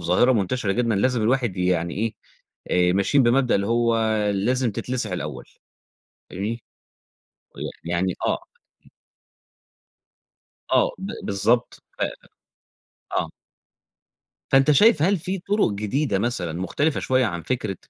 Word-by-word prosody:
ظاهرة 90 +10 +3
منتشرة 105 -1 0
جدًا 115 0 0
لازم 120 +3 +1
الواحد 120 -4 +1
يعني 90 -2 0
إيه، 110 +2 -2 0.8
آآ - - +2
ماشيين 100 +9 +3
بمبدأ 125 +1 +3
اللي 100 0 +1
هو 115 +1 +2 0.3
لازم 120 +5 +1
تتلسع 120 -3 -2
الأول 75 -7 -5 0.9
فاهمني؟ 105 +5 -4 0.9
ويع - - -5 0.2
يعني 85 +2 -1
آه. - - +1 2.4
آه، - - +4
ب 195 +2 -5
بالضبط. 115 +5 0 0.2
ف - - -2 1.2
آه. - - -1 1.2
فأنت 135 +2 +5
شايف 155 - +5
هل 195 +5 +3
في 185 +4 -3
طرق 200 - +1
جديدة 105 +2 -1
مثلًا 105 -7 -1
مختلفة 145 +11 0
شوية 130 -1 +2
عن 85 -5 -4
فكرة، 110 -7 -2
115 Hz, 115 wpm, -23 LUFS, 95-130 Hz, 2.4 s, فأنت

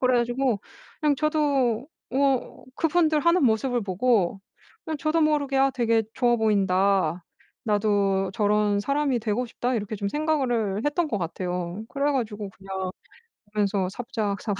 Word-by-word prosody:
그래 255 -1 +3
가지고 240 -2 0 0.4
그냥 295 -3 +2
저도 280 -5 +1 0.2
어 270 -1 0
그분들 320 -1 +2
하는 340 -2 +3
모습을 240 +2 +2
보고 200 0 +1 0.5
그냥 315 -2 -4
저도 320 +1 +1
모르게 290 -3 +1
'아 270 0 +4
되게 230 -3 +1
좋아 245 -2 +3
보인다. 195 -5 +2 0.4
나도 200 -2 +1
저런 210 -1 +2
사람이 275 0 0
되고 225 +3 -1
싶다.' 245 +2 -2
이렇게 215 -1 -3
좀 200 0 -2
생각을 245 -9 0
했던 305 +2 +1
것 215 - -1
같아요. 180 +2 -4
그래 285 +2 0
가지고 210 -6 -3
그냥 190 -1 -5 0.7
보면서 200 -2 +1
사부작사부작 215 -2 -3
230 Hz, 310 characters per minute, -25 LUFS, 200-275 Hz, 0.7 s, 아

